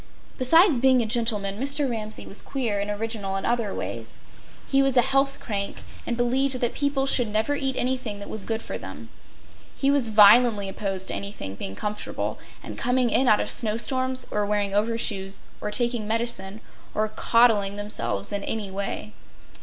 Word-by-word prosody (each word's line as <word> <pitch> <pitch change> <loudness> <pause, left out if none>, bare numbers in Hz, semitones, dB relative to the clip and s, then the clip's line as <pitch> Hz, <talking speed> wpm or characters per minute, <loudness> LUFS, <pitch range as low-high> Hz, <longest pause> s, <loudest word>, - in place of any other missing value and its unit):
Besides 325 +3 +5
being 260 -1 +4
a - - -3
gentleman, 215 -3 +1
Mr. 280 +2 0
Ramsay 220 -3 -5
was 200 - -3
queer 235 -7 -2
and 200 +1 -2
original 205 -2 -3
in 195 - -3
other 235 -4 0
ways. - - -6 0.5
He 275 0 +2
was 270 -1 +2
a 245 - +7
health 275 +1 +2
crank, 200 -3 -4 0.2
and 235 - -1
believed 255 +2 +1
that 240 -1 0
people 280 -1 0
should 250 -3 +3
never 215 +7 0
eat 270 -2 -1
anything 250 -4 -1
that 200 - -8
was 220 - -5
good 225 +1 -3
for - - -5
them. - - -9 0.7
He 275 0 +2
was 280 -4 +2
violently 215 0 +6
opposed 195 -1 -3
to - - -1
anybody 200 - -5
being 95 0 -6
comfortable, 210 - -4 0.2
and - - -8
coming 250 -1 +2
in 260 - +3
out 210 - +5
of - - -2
snow 220 -2 0
storms, 260 +1 0
or 210 - 0
wearing 205 -1 -1
overshoes, 205 -2 -1 0.2
or 210 - -2
taking 235 0 -1
medicine, 220 -3 -3 0.3
or 215 0 +1
coddling 215 -2 +3
themselves 120 - -2
in 200 0 -2
any 210 -3 -3
way. 200 +2 -4
225 Hz, 175 wpm, -25 LUFS, 205-255 Hz, 0.7 s, a